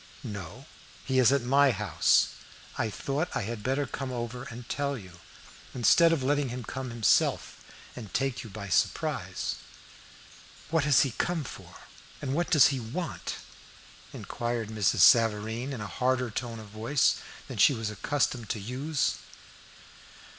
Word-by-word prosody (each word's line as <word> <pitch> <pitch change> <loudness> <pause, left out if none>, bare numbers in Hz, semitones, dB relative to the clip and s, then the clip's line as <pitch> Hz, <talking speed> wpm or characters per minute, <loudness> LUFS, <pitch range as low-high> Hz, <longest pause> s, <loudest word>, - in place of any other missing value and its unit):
"No, 100 +5 -7 0.4
he 130 -1 +1
is 125 0 +6
at 140 -3 +2
my 140 +3 +4
house. 105 - +3 0.5
I 110 - -1
thought 140 - -2
I - - -1
had 115 +1 -5
better 135 +5 0
come 135 -1 -5
over 120 0 -5
and 120 0 -9
tell 140 -1 -2
you, 90 -5 -12 0.6
instead 165 +7 +5
of 160 -5 0
letting 145 0 +1
him 125 +1 -5
come 130 +3 -5
himself 115 -2 +1 0.3
and 110 -6 -9
take 135 -1 -1
you 115 - -9
by 100 0 -7
surprise." 95 - -1 1.1
"What 160 -3 +2
has 145 -2 +5
he 135 - +1
come 165 +7 -1
for, - - -10 0.4
and 135 -2 -3
what 170 +4 0
does 150 -5 +7
he 135 -2 -2
want?" 155 +10 -5 0.8
inquired 120 -2 -4
Mrs. 110 -2 +1
Savareen, 115 +3 +4
in 130 -5 -5
a - - -4
harder 125 +4 0
tone 115 +1 -4
of 110 -1 -11
voice 115 +7 +1 0.3
than - - -7
she 140 - +6
was 110 -2 -3
accustomed 120 0 -1
to 110 - -2
use. 130 +8 -1
125 Hz, 155 wpm, -28 LUFS, 110-140 Hz, 1.1 s, does